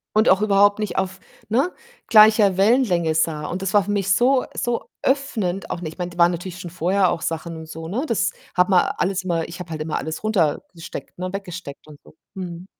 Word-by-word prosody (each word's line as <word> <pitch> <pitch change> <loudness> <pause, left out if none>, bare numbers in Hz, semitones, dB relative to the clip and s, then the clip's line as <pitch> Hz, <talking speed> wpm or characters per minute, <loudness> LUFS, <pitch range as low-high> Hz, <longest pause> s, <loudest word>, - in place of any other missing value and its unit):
und 215 +2 +4
auch 190 +2 +4
überhaupt 205 0 +4
nicht 210 -2 -3
auf, 190 0 -2 0.3
ne, 270 +11 +2 0.4
gleicher 215 -3 +6
Wellenlänge 195 -7 +3
sah. 155 -1 0
Und 180 +4 -4
das 195 0 -2
war 205 - +5
für 205 - -2
mich 195 -2 0
so 250 +6 +3
so 240 -1 -1 0.2
öffnend 220 -9 -1
auch 175 - -4
ne, 160 - -4
ich 155 - -9
meine, 180 -1 -3
da 175 - -14
waren 170 0 +5
natürlich 180 +1 -6
schon 175 - -7
vorher 180 +2 +1
auch 165 - -3
Sachen 165 0 -4
und 160 0 -9
so, 160 0 -7
ne? 245 - -2
Das 230 - +1 0.2
hat 180 0 +3
man 180 -2 +4
alles 190 0 -1
immer 170 -3 -1
ich 175 +2 -9
habe 175 -2 -9
halt 155 -1 -4
immer 155 0 -2
alles 160 +5 -5
runtergesteckt 170 -5 -2
ne, 185 0 -4
weggesteckt 180 -7 -7
und 150 -2 -14
so, - - -18 0.2
mhm. 180 -1 -7
185 Hz, 220 wpm, -22 LUFS, 170-205 Hz, 0.4 s, gleicher